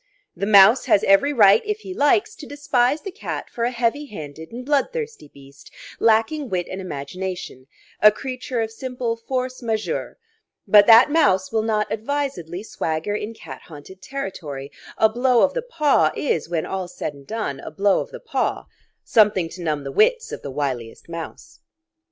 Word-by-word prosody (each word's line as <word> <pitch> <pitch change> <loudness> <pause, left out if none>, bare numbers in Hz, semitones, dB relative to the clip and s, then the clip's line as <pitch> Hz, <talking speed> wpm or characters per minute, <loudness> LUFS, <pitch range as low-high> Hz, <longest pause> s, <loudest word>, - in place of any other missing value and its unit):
The 200 - -3
mouse 210 +4 +7
has 200 - +3
every 195 +9 +4
right, 210 -6 +6
if 425 0 -3
he 380 - -7
likes, 390 +8 +2
to 295 - -10
despise 285 -1 0
the 390 - -5
cat 415 - -6
for 235 - -2
a - - +1
heavy 245 +4 -1
handed 160 - -9
and 245 +2 -8
bloodthirsty 450 - -2
beast, 140 0 -16 0.3
lacking 230 +6 +2
wit 180 -3 -1
and 190 - -5
imagination, 180 -3 -6 0.3
a 210 - +8
creature 255 0 -4
of 220 0 -3
simple 245 0 -4
force 255 +2 -4
majeure; 220 -2 -3 0.5
but 205 -1 +7
that 235 +5 +8
mouse 190 - +2
will 220 -1 +1
not 215 -1 0
advisedly 220 - -3
swagger 160 -2 -3
in 215 +2 -5
cat 135 -10 -10
haunted 170 +4 -12
territory; 155 - -6 0.3
a 220 - +5
blow 245 +2 +2
of 285 - +2
the - - -2
paw 300 - +2
is, 165 - -1
when 165 -2 -1
all's 185 -2 -5
said 150 - -3
and 140 -1 -16
done, 215 -12 -4
a - - -8
blow 195 +5 +2
of - - -5
the - - -9
paw - - -2 0.4
something 205 -6 +3
to 180 - -10
numb 155 -4 -2
the 135 - -5
wits 470 - +2
of - - -6
the - - -7
wiliest 130 -2 -4
mouse. 165 -1 -8
220 Hz, 175 wpm, -22 LUFS, 175-265 Hz, 0.5 s, a